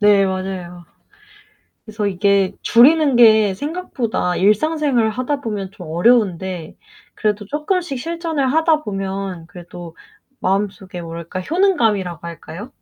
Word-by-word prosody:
네. 205 -1 +5
맞아요. 185 -2 -5 1.0
그래서 215 -2 -3
이게 200 0 +2
줄이는 280 +3 +5
게 220 -4 +6
생각보다 255 - -3
일상생활을 245 - +2
하다 255 +5 -2
보면 205 -6 -4
좀 180 -4 -11
어려운데 185 -3 +1 0.4
그래도 210 -1 -1
쪼끔씩 300 - -2
실전을 325 -3 -2
하다 320 -1 +2
보면 195 - -4
그래도 175 -1 -11 0.4
마음속에 190 -1 -2
뭐랄까? 170 +2 -6
효능감이라고 215 - 0
할까요? 170 - -9
205 Hz, 295 characters per minute, -19 LUFS, 185-270 Hz, 1.0 s, 게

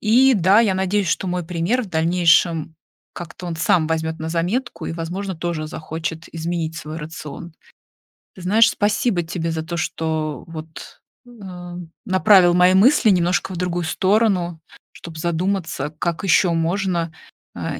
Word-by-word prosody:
И 250 +5 +5
да, 190 +1 +4
я 205 -5 +2
надеюсь, 190 0 0
что 190 - -1
мой 180 -1 -2
пример 180 +9 0
в 220 - -7
дальнейшем 165 -1 +2 0.4
как-то 175 +1 -8
он 170 - -3
сам 165 -1 +2
возьмёт 160 0 -2
на 160 - -4
заметку 180 +10 -2
и, - - -3
возможно, 180 +4 -4
тоже 165 -2 -3
захочет 160 +1 -5
изменить 165 -1 -3
свой 155 -1 -7
рацион. 155 +1 -8 0.8
Ты 185 - -12
знаешь, 220 +6 +4
спасибо 210 -2 0
тебе 165 0 -3
за 160 -1 -3
то, 170 +2 -5
что 160 -4 -3
вот, 160 -1 -10 0.3
э, 185 -7 -10 0.3
направил 185 -2 +5
мои 180 +1 +5
мысли 225 +2 +5
немножко 175 0 +1
в - - -5
другую 175 0 -2
сторону, 185 -1 +1 0.3
чтоб 165 -2 -10
задуматься, 170 -1 -2
как 170 +2 -2
еще 180 -1 +4
можно, 170 0 -1 0.4
а, - - -4
175 Hz, 150 wpm, -21 LUFS, 165-190 Hz, 0.8 s, И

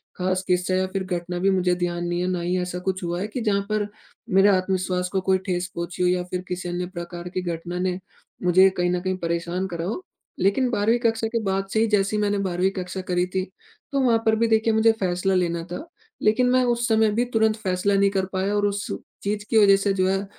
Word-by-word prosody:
खास 185 0 -1
किस्सा 180 0 +1
या 185 0 +2
फिर 190 0 -3
घटना 180 -1 -3
भी 195 +2 +2
मुझे 180 -2 +2
ध्यान 175 -1 -2
नहीं 175 0 -1
है, 180 - 0
ना 180 -1 -1
ही 180 +2 0
ऐसा 180 0 -4
कुछ 185 0 -3
हुआ 175 0 -2
है 205 - -2
कि 230 +3 -5
जहाँ 205 -3 +1
पर 215 -1 0 0.4
मेरे 195 0 +5
आत्मविश्वास 185 -1 0
को 190 +1 -1
कोई 190 0 +2
ठेस 180 -2 -1
पहुँची 170 +1 -3
हो - - +4
या 180 0 +1
फिर 180 - -2
किसी 180 -1 -4
अन्य 175 +1 -2
प्रकार 175 0 -6
की 185 +1 -3
घटना 175 +2 -5
ने 180 0 0 0.5
मुझे 185 +2 +6
कहीं 175 0 +1
न 180 - 0
कहीं 185 0 -2
परेशान 170 +2 -2
करा 170 -2 -4
हो। 225 - -4 0.4
लेकिन 245 +7 +2
12वीं 230 +1 +2
कक्षा 225 -2 +1
के 230 +1 -1
बाद 195 0 -1
से 220 - +2
ही 225 - +3
जैसे 205 -1 +1
ही 210 - +1
मैंने 205 0 +1
12वीं 190 -1 0
कक्षा 185 -1 -5
करी 180 0 +2
थी, 185 0 -2 0.5
तो 280 - +1
वहाँ 240 -3 +4
पर 220 0 +4
भी 230 +1 +2
देखिए 225 0 +2
मुझे 220 +1 +5
फैसला 185 0 0
लेना 170 -2 0
था। 285 - -5 0.4
लेकिन 220 +4 +3
मैं 255 0 +4
उस 240 -1 +1
समय 220 -2 +3
भी 235 +4 +1
तुरंत 220 -1 +3
फैसला 195 -1 0
नहीं 200 0 +4
कर 190 -1 0
पाया 190 +2 0
और 205 0 +2
उस 200 0 -2 0.4
चीज़ 205 +1 -2
की 225 - +3
वजह 200 -2 +7
से 195 0 0
जो 185 -1 +1
है 195 +1 0
190 Hz, 240 wpm, -24 LUFS, 180-210 Hz, 0.5 s, वजह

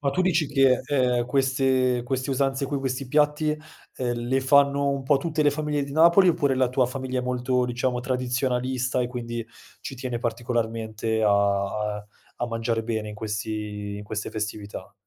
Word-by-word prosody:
Ma 140 -1 +1
tu 140 - -1
dici 175 -4 +2
che, 135 -3 +3
ehm, 125 -4 +1
queste 130 -2 +2
queste 130 +1 -2
usanze 135 +1 0
qui, 140 +1 -2
questi 130 -1 -3
piatti, 150 +2 +2 0.4
ehm, 125 -2 -1 0.2
le 135 +1 +2
fanno 140 +1 +4
un 140 -1 -2
po' 140 +2 +3
tutte 155 +2 -1
le 145 - +4
famiglie 150 0 -1
di 140 - -6
Napoli, 170 +4 +6
oppure 145 -6 +2
la 130 -1 +2
tua 125 0 +2
famiglia 130 0 -3
è - - -1
molto, 125 0 0
diciamo, 125 0 -1
tradizionalista 125 0 -1
e 120 - 0
quindi 120 -2 -5 0.4
ci - - -6
tiene 125 -2 -3
particolarmente 115 -2 -2
a 105 - +4 0.7
a 105 - -13 0.3
a 120 - 0
mangiare 115 -1 -2
bene 110 -2 -2
in 105 - -7
questi 105 -1 -4
in 105 - -8
queste 105 0 -4
festività? 105 -1 -5
125 Hz, 175 wpm, -25 LUFS, 120-140 Hz, 0.7 s, Napoli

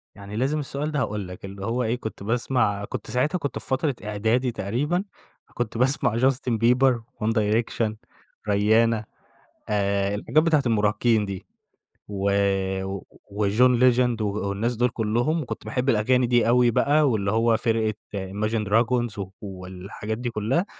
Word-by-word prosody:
يعني 100 +1 -9
لازم 135 +6 0
السؤال 145 +2 -3
ده، 150 - -1
هاقول 105 -6 -2
لك 90 +2 -9
اللي 95 0 -7
هو 120 +2 0
إيه 115 +1 0
كنت 110 -5 -7
باسمع 115 -3 0
كنت 110 - -6
ساعتها 145 +9 +1
كنت 140 -5 -4
في - - -11
فترة 135 0 0
إعدادي 110 +4 0
تقريبًا 140 - -1 0.5
كنت 120 -2 -3
باسمع 125 -2 +2
Justin 130 0 +1
Bieber, 125 +2 +4 0.3
One 115 - +2
Direction, 110 0 0 0.6
Rihanna 110 +2 +3 0.7
آآ، 100 -1 0
الحاجات 155 +9 +2
بتاعة 155 -4 +3
المراهقين 110 0 +2
دي 100 -2 -6 0.6
و 100 -1 -1 1.0
وJohn 110 +5 +3
legend 125 -2 +3
و - - 0 0.2
والناس 110 +5 -1
دول 120 +2 +2
كلُّهم، 120 +9 0
وكنت 115 -6 -6
باحب 125 +5 -1
الأغاني 125 +2 +3
دي 120 -1 +3
أوي 120 0 +4
بقى، 145 +4 +3
واللي 100 -4 0
هو 115 0 +3
فرقة 110 -2 0 0.2
imagine 105 +3 -2
dragons 115 -1 +1 0.2
والحاجات 95 +2 -6
دي 120 0 -3
كلَّها 120 - 0
115 Hz, 145 wpm, -24 LUFS, 105-125 Hz, 1.0 s, Bieber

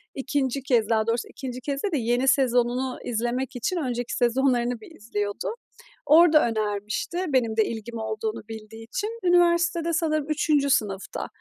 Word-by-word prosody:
2. 270 -1 -1
kez, 235 -5 +2
daha 220 -1 +2
doğrusu, 230 +1 0
2. 255 -1 -7
kez 275 +1 -3
değil 405 - 0
de - - +2
yeni 250 +2 +1
sezonunu 250 -1 +2
izlemek 245 +3 -2
için 345 +9 -1
önceki 245 -5 -2
sezonlarını 245 -1 +1
bir 330 - -13
izliyordu. 205 - -3 0.5
Orada 310 -3 +6
önermişti 215 - -2
benim 230 -5 +1
de 220 - +4
ilgim 230 +1 -6
olduğunu 220 0 -3
bildiği 225 0 -9
için. 425 - -4
Üniversitede, 340 -1 +3
sanırım, 310 -2 0
3. 295 -2 +2
sınıfta. 200 -6 -1
250 Hz, 145 wpm, -25 LUFS, 225-300 Hz, 0.5 s, Orada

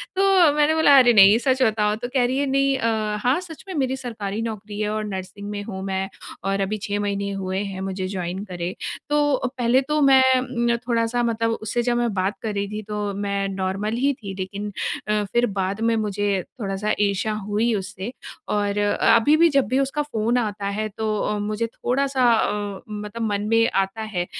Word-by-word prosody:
तो 380 -5 +5
मैंने 300 +1 +3
बोला, 290 -3 +6
"अरे 245 -2 +6
नहीं! 200 +1 +8
सच 260 +1 +1
बताओ।" 210 -2 +2
तो 245 +2 -5
कह 255 -2 +3
रही 255 +2 0
है, 285 - +1
"नहीं 275 0 +2
अ, 220 -3 0
हाँ, 255 +7 +3
सच 330 -4 -11
में 375 - -5
मेरी 265 -2 0
सरकारी 220 -5 -4
नौकरी 215 -2 -5
है 210 0 0
और 215 0 -2
नर्सिंग 200 +1 -6
में 205 -1 -4
हूँ 190 -3 -6
मैं, 190 0 -2 0.3
और 195 0 0
अभी 210 +2 -1
6 205 0 -2
महीने 200 -1 -2
हुए 190 -1 -3
हैं 190 -1 -5
मुझे 190 -1 -3
जॉइन 185 0 -4
करे।" 180 -1 -4 0.4
तो 290 -3 +2
पहले 245 +2 +3
तो 300 +3 -1
मैं 270 -1 +6
अम, 245 -2 +1
थोड़ा-सा 235 0 +1
मतलब 230 -1 0
उससे 235 +3 -1
जब 240 0 +1
मैं 240 -3 0
बात 195 +1 -1
कर 220 -2 -3
रही 200 0 -2
थी, 210 +1 -5
तो 210 -1 -3
मैं 200 0 -2
नॉर्मल 195 +3 -2
ही 280 - +3
थी 200 -6 -8
लेकिन 200 +2 -4 0.4
अ, 210 0 +1
फिर 240 0 +4
बाद 195 +3 -1
में 230 - +2
मुझे 205 -2 0 0.2
थोड़ा-सा 200 +2 -1
ईर्ष्या 205 +1 +1
हुई 220 +3 +1
उससे। 190 +3 -5 0.4
और 205 -1 0
अभी 230 +7 +4
भी 335 0 +5
जब 275 -5 +2
भी 260 +3 +1
उसका 275 +2 0
फ़ोन 235 -4 0
आता 205 -3 -2
है 215 - -1
तो 215 -1 -1
अ, 210 - -1
मुझे 215 +2 -2
थोड़ा-सा 260 +1 +1
अ, 205 -3 -1
मतलब 210 +2 -6
मन 205 +1 -2
में 230 0 +4
आता 195 +3 0
है। 190 -5 -2
215 Hz, 200 wpm, -23 LUFS, 200-245 Hz, 0.4 s, नहीं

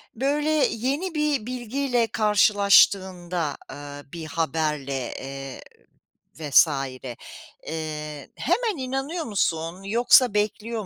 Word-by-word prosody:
Böyle, 290 +5 0 0.2
yeni 280 - -2
bir 295 -7 0
bilgiyle 245 0 -1
karşılaştığında, 190 -6 +3
aaa, 145 0 -8
bir 165 -2 -6
haberle, 150 -5 -2
eee, 135 0 -7 0.8
vs. 150 +1 +5 1.0
eee, 150 -2 -5
hemen 455 -6 0
inanıyor 270 +5 -3
musun, 175 -3 -1
yoksa 235 +2 +4
bekliyor 215 +1 -2
205 Hz, 90 wpm, -24 LUFS, 155-255 Hz, 1.0 s, vs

